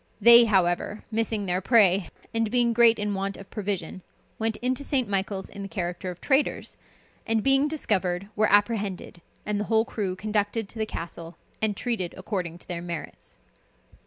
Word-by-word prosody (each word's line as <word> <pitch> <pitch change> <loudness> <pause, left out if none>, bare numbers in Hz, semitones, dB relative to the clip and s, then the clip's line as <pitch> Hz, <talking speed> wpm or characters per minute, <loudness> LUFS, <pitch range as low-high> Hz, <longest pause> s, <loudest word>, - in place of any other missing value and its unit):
They, 235 +2 +9
however, 190 0 0
missing 220 -2 -1
their 180 0 -1
prey, 195 -4 +4 0.2
and 225 -1 0
being 240 0 +3
in - - 0
great 235 0 +5
want 200 -1 -2
of 195 - -13
provision, 195 -4 -4 0.4
went 220 -1 -1
into 255 +2 -1
St. 265 -4 0
Michael's 195 -1 -2
in 200 - -9
the 195 - -5
character 180 -2 -4
of 180 -1 -8
traders, 280 +1 0 0.5
and 225 -1 +1
being 270 +1 +4
discovered, 195 - -1
were 215 -1 +2
apprehended, 205 -4 0 0.2
and 210 -1 -1
the 210 - -2
whole 220 +1 +2
crew 195 -6 -3
conducted 210 +2 -1
to 230 - -10
the 220 - -1
castle, 170 -2 -7 0.2
and 215 -2 0
treated 220 -8 -3
according 185 -3 -4
to - - -11
their 170 -1 -4
merits. 170 -2 -7
205 Hz, 170 wpm, -26 LUFS, 185-225 Hz, 0.5 s, They